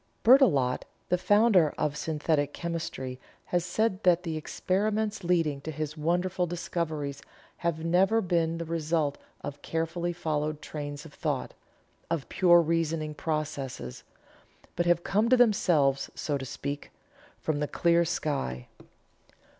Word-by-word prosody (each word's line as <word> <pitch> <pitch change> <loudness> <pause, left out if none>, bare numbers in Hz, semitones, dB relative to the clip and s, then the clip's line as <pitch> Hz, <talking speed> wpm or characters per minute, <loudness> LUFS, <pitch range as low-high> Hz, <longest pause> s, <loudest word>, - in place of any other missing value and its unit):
Berthelot, 180 - +5 0.3
the 180 - +3
founder 205 -6 +4
of 150 -1 0
Synthetic 150 -2 0
Chemistry 160 -7 -4 0.3
has 175 -1 0
said 190 +2 0
that 180 -2 +4
the 165 -3 -3
experiments 205 +6 -1
leading 165 -5 +1
to 160 - -6
his 155 0 -4
wonderful 175 +3 0
discoveries 160 -5 -3 0.4
have 165 -1 -2
never 190 +6 +4
been 170 -4 0
the 170 - -4
result 160 -2 -1 0.2
of 145 0 -7
carefully 165 +2 -2
followed 155 -3 -2
trains 145 -1 -6
of 155 - -12
thought 145 -6 -2 0.6
of 165 -5 -2
pure 175 -2 +6
reasoning 160 -1 -1
processes 145 - -4 0.7
but 175 0 0
have 175 0 +3
come 210 +3 +2
of 255 +1 +5
themselves, 160 - +3
so 145 - -2
to 135 -1 -3
speak, 140 +2 -5 0.5
from 155 -2 -1
the 150 - 0
clear 170 +2 +3
sky. 140 - -2
165 Hz, 130 wpm, -28 LUFS, 150-175 Hz, 0.7 s, pure